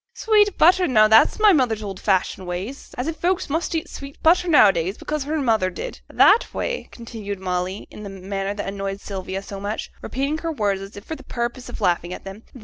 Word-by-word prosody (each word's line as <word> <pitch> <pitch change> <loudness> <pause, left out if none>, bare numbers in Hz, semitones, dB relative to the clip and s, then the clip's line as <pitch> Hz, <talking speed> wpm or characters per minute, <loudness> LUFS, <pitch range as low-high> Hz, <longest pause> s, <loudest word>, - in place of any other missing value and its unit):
'(Sweet 420 -3 +3
butter! 360 +2 +5
now 215 -4 +5
that's 220 +1 +5
my 425 -2 +6
mother's 235 -8 +1
old 195 -2 -6
fashioned 190 -1 0
way; 180 +4 -3
as 265 -2 -7
if 325 +1 -3
folks 360 -3 0
must 330 +2 -1
eat 320 - -2
sweet 280 0 -10
butter 355 +2 +4
now 295 -11 +7
a - - +2
days, 180 +5 -2
because 300 -2 -3
her 310 +2 -1
mother 220 -8 +2
did!) - - -7
That 440 +4 +5
way,' - - -3
continued 215 -4 -7
Molly, 185 +1 -3
in - - -10
the 205 - -7
manner 195 +1 -4
that 205 - -4
annoyed 195 0 -4
Sylvia 190 -1 -5
so 195 0 -8
much, 205 +2 -4
repeating 280 +4 -2
her 330 +1 -3
words 205 -8 -1
as 195 +1 -10
if 205 - -10
for 320 - -5
the - - -13
purpose 240 +1 -4
of - - -8
laughing 175 -1 0
at - - -12
them. 195 +2 -9
215 Hz, 225 wpm, -22 LUFS, 195-310 Hz, -, now